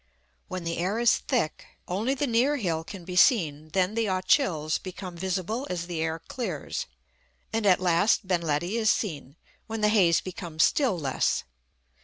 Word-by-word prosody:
When 185 -1 -5
the 165 0 -3
air 190 +5 0
is 235 -1 +4
thick, 155 0 -1 0.2
only 215 +9 0
the 290 - 0
near 255 +4 +2
hill 165 - -1
can 180 0 -9
be 180 0 -6
seen; 155 - +3
then 190 +1 +2
the 225 -1 0
Ochils 185 - +1
become 185 -1 -7
visible 190 +8 -2
as 175 -2 -3
the 170 -2 -4
air 160 0 -1
clears; 170 - -5 0.7
and 225 -2 +1
at 185 -2 +5
last 185 +4 +2
Ben 180 -2 +1
Ledi 170 +6 -1
is 220 -2 +3
seen, 150 - -2 0.3
when 225 -1 -4
the 210 - +4
haze 185 -6 +4
becomes 175 -3 -2
still 255 -11 +2
less. 140 -5 0
185 Hz, 170 wpm, -27 LUFS, 165-220 Hz, 0.7 s, at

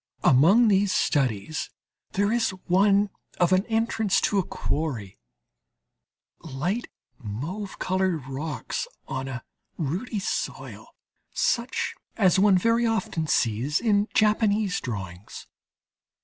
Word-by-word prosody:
Among 185 - +6
these 200 -1 +3
studies 135 - 0 0.4
there 200 +2 +1
is 235 -1 +2 0.2
one 200 +2 +3 0.3
of 175 +1 +3
an 185 +3 +2
entrance 225 -3 +1
to 205 - +2
a - - +1
quarry: 130 - -4 1.2
light 165 - -3 0.3
mauve 145 - -5
coloured 185 -6 0
rocks 135 -1 -4 0.2
on 130 0 -4
a 130 -1 -6 0.3
ruddy 185 - -3
soil, 195 - -4 0.5
such 255 - 0 0.2
as 190 -4 +4
one 195 -1 +5
very 230 +4 +2
often 185 -7 -1
sees 125 +5 +1
in 210 -3 +2
Japanese 215 -3 +2
drawings. 95 -5 -7
185 Hz, 105 wpm, -25 LUFS, 135-210 Hz, 1.2 s, Among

